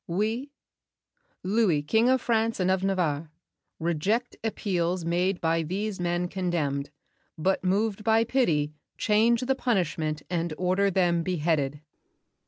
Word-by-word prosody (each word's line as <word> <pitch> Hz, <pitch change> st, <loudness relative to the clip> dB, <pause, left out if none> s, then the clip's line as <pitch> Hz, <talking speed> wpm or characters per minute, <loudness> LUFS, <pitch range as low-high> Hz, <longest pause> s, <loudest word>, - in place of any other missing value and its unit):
"We, 220 Hz, +10 st, -1 dB, 0.9 s
Louis, 185 Hz, -6 st, +2 dB
King 220 Hz, +11 st, +3 dB
of 260 Hz, 0 st, +3 dB
France 225 Hz, -1 st, +1 dB
and 185 Hz, 0 st, +2 dB
of 190 Hz, 0 st, 0 dB
Navarre, 165 Hz, -6 st, 0 dB, 0.5 s
Reject 180 Hz, +9 st, 0 dB
appeals 180 Hz, -5 st, -1 dB
made 180 Hz, +2 st, +1 dB
by 165 Hz, 0 st, +1 dB
these 195 Hz, +5 st, -3 dB
men 175 Hz, 0 st, 0 dB
condemned, 160 Hz, -7 st, -2 dB, 0.5 s
But 185 Hz, +5 st, 0 dB
moved 205 Hz, +3 st, 0 dB
by 225 Hz, +1 st, +4 dB
pity, 165 Hz, -, +1 dB, 0.2 s
change 225 Hz, +3 st, +3 dB
the 260 Hz, +1 st, +1 dB
punishment 160 Hz, -, -1 dB
And 170 Hz, -2 st, -2 dB
order 185 Hz, +2 st, +2 dB
them 175 Hz, -3 st, +2 dB
beheaded." 155 Hz, -5 st, -1 dB
185 Hz, 125 wpm, -27 LUFS, 165-215 Hz, 0.9 s, by